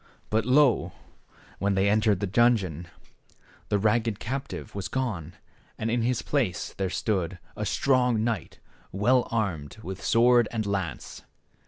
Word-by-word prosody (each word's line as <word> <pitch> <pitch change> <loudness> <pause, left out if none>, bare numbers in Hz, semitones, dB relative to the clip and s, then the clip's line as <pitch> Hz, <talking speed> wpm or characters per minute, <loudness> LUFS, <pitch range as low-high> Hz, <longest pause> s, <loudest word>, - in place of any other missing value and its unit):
But, 110 +1 +1
lo! 135 -1 +4 0.7
when 100 0 +1
they 95 +1 +2
entered 105 -2 +2
the - - +1
dungeon, 95 -6 +2 0.8
the 105 - +2
ragged 110 +1 +1
captive 135 +4 -5
was 100 -2 -4
gone, 90 - -3 0.4
and 110 +1 -2
in 120 0 +1
his 120 +1 0
place 120 -12 -1
there 95 -1 -2
stood 95 -2 -1 0.2
a 105 - -3
strong 125 -4 +2
knight 115 -2 -3 0.3
well 120 +6 +2
armed 95 -11 -2
with 95 -1 -7
sword 120 0 +4
and 110 -2 -2
lance. 95 -8 -4
110 Hz, 140 wpm, -27 LUFS, 95-120 Hz, 0.8 s, lo